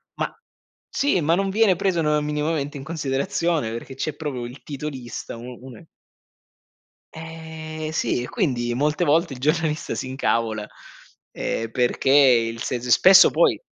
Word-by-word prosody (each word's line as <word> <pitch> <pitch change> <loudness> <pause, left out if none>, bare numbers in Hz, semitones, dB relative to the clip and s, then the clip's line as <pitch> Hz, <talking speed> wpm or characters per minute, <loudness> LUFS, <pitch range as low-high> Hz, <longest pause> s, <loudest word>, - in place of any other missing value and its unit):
ma - - -3 0.5
Sì, 275 -10 +1
ma 165 +2 +2
non 195 +1 0
viene 205 -1 +3
preso, 175 -1 0
no, 150 -1 +2
minimamente 150 -1 -2
in 135 - -8
considerazione 155 - -1
perché 115 +3 -7
c'è 145 +2 -3
proprio 140 -6 -4
il 125 +3 -10
titolista, 135 -5 -6
u 125 +1 -9
une 130 +5 -12 1.3
Eh 160 -1 -7
sì, 125 -5 0
e - - -6
quindi 125 - -1
molte 150 +4 0
volte 160 +1 +2
il 125 - -9
giornalista 155 +2 0
si - - -4
incavola, 115 -5 -1 0.6
ehm, 115 0 -3
perché 125 +3 0
il 120 -5 +4
se 125 -2 -2
spesso 185 +10 +7
poi - - +2
150 Hz, 145 wpm, -23 LUFS, 125-160 Hz, 1.3 s, spesso